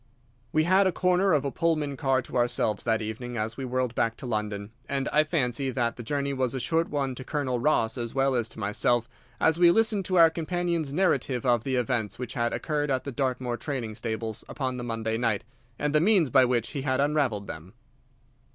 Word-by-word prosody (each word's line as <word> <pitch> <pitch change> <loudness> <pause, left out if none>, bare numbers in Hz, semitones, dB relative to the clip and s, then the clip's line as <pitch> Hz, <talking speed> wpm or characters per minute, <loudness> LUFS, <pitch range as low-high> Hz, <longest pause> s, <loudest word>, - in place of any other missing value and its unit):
We 155 - +3
had 190 +4 +4
the - - +2
corner 180 +2 +2
of 145 -4 +2
a 140 - -1
Pullman 155 -3 0
car 135 -2 +1
to - - -10
ourselves 120 -4 +1
that 110 -2 +1
evening 120 +3 -5
as 110 +2 -2
we 135 - -5
whirled 125 -1 -1
back 115 -1 0
to - - -8
London, 105 -3 -3 0.2
and 135 -1 -1
I 150 - +4
fancy 135 -5 -1
that 120 -2 -1
the - - -7
journey 140 +3 -2
was 130 -2 -1
a - - -1
short 165 +7 0
one 140 -3 -1
to 130 - -7
Colonel 130 -3 -2
Ross 125 -3 +1
as 115 +1 -4
well 135 0 +2
as 120 -2 0
to - - -10
myself, 110 +3 +1 0.3
as 160 +1 +3
we 175 -1 +7
listened 215 0 +2
to 185 - -1
our 165 -1 +7
companion's 170 -2 -2
narrative 140 -7 +1
of 120 -3 +3
the 130 0 -1
events 120 -4 -1
which 125 - -5
had 120 -1 0
occurred 150 -2 -2
at 130 -2 0
the 140 - -5
Dartmoor 125 -2 -2
training 120 -4 -4
stables 110 0 -4
upon 130 -3 -3
the 120 - -5
Monday 115 -1 -2
night, 115 -4 0 0.3
and 150 0 -1
the 150 - +4
means 180 - +3
by 130 -2 +6
which 120 -2 0
he 140 - -3
had 130 -1 0
unravelled 140 -8 +1
them. 80 +3 -9
130 Hz, 215 wpm, -27 LUFS, 120-150 Hz, 0.3 s, we